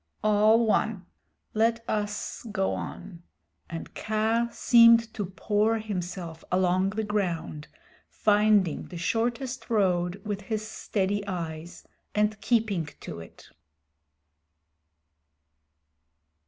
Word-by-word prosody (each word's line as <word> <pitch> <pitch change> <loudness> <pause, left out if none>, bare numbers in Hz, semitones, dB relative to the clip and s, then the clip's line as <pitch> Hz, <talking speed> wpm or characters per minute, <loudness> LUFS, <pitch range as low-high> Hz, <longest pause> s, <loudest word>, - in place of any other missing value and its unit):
"All 215 +2 +4
one. 215 -3 0 0.5
Let 230 +1 +1
us 210 0 -3
go 195 -2 0
on," 170 -3 -7 0.5
and 165 -1 -7
Kaa 220 +2 0
seemed 230 -1 +6
to 205 -5 -3
pour 210 +4 +1
himself 180 -5 -5
along 185 +1 +2
the 215 +2 -2
ground, 175 -7 -2 0.4
finding 210 -5 +2
the 180 - -8
shortest 240 +8 -2
road 185 -4 +1
with 205 -1 -3
his 215 +1 -3
steady 205 -1 -2
eyes, 170 -2 -6 0.3
and 210 0 +1
keeping 215 -9 +1
to - - -7
it. 80 - -13
210 Hz, 100 wpm, -27 LUFS, 180-220 Hz, 0.5 s, seemed